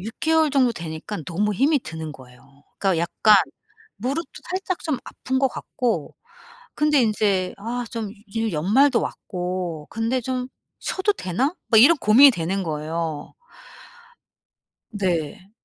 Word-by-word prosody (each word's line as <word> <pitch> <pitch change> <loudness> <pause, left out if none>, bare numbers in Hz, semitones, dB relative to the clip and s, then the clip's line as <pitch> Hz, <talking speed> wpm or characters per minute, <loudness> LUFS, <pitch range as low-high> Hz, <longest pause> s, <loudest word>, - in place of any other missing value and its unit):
6 220 +3 -6
개월 320 -1 +3
정도 260 -3 +3
되니까 170 +2 -6
너무 205 +5 0
힘이 280 +6 +3
드는 160 -7 -7
거예요. 135 +2 -17
그러니까 190 -4 +1
약간 210 +5 +4 0.6
무릎도 275 +9 -3 0.2
살짝 370 -1 -2
좀 300 -6 -2
아픈 260 0 -3
거 270 0 +3
같고 230 - -3 0.6
근데 300 -3 +3
인제 205 -4 +1
아 240 +4 -4
좀 225 -3 -4 0.2
요즘 225 0 -2
연말도 235 - +3
왔고 180 -4 -4
근데 230 +3 -1
'좀 255 +1 -3 0.3
쉬어도 390 +2 0
되나?' 255 - -1
막 220 -3 +6
이런 330 +6 +7
고민이 260 +4 +7
되는 190 +1 -2
거예요. 155 -1 -4 1.6
네. 190 -1 -2
215 Hz, 255 characters per minute, -23 LUFS, 170-260 Hz, 1.6 s, 이런